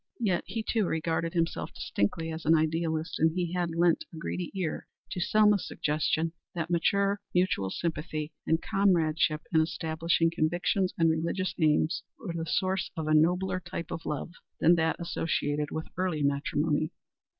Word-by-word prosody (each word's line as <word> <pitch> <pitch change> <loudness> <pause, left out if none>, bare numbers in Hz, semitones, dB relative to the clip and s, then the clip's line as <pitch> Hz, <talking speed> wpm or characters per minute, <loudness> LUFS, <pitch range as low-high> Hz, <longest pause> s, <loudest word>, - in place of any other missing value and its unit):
Yet 195 -7 +1
he, 225 -1 -3
too, 215 -3 +1
regarded 165 0 -1
himself 165 -1 -1
distinctly 160 +11 -1
as 160 0 -6
an 160 +1 +5
idealist, 160 0 0
and 160 +1 +4
he 175 -1 -1
had 175 -2 -1
lent 175 - +3
a 165 - -10
greedy 170 +2 -3
ear 180 -5 -3 0.2
to - - -3
Selma's 210 +2 +3
suggestion 155 +2 0 0.2
that 170 0 -3
mature 200 +4 +2
mutual 180 - +2
sympathy 155 - -3 0.2
and 160 - +3
comradeship 165 -6 +2
in 160 - +6
establishing 165 +1 +1
convictions 175 +3 +1
and 165 - +4
religious 170 +4 -1
aims 155 +1 +2 0.2
were 215 -11 -5
the 165 -1 -4
source 190 +1 0
of 160 - -2
a 155 - +1
nobler 180 +4 +3
type 175 -2 -6
of 165 - -5
love 150 +2 -3 0.3
than 165 +2 +6
that 160 -1 +2
associated 150 -3 -1
with 160 - -4
early 180 -5 0
matrimony. 145 +2 +1
165 Hz, 160 wpm, -29 LUFS, 155-180 Hz, 0.3 s, in